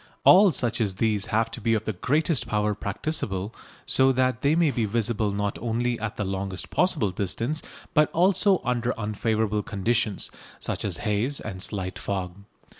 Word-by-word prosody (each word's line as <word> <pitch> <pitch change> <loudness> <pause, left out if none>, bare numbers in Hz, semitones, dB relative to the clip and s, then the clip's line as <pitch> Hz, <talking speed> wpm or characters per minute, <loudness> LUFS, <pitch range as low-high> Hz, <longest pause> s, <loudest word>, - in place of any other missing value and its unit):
All 195 +2 +8
such 120 -4 -1
as 100 -4 0
these 105 -1 0
have 115 +1 +1
to 120 - -7
be 115 +1 +2
of 110 - -1
the 110 - -1
greatest 150 - 0
power 105 0 +1
practicable, 100 -2 -3 0.3
so 130 0 +4
that 130 -1 +1
they 145 +3 +3
may 165 -3 +3
be 115 -4 0
visible 110 0 0
not 100 0 -2
only 120 +1 -1
at 110 -1 -4
the 105 - -1
longest 95 -1 -4
possible 160 - +2
distance, 115 - -2 0.3
but 150 -2 +4
also 190 +2 +3
under 125 0 0
unfavourable 110 0 0
conditions, 110 0 -1 0.3
such - - -3
as - - -1
haze 110 +7 0
and 95 -3 -6
slight 95 -2 -2
fog. 95 -3 -3
110 Hz, 170 wpm, -26 LUFS, 100-130 Hz, 0.3 s, All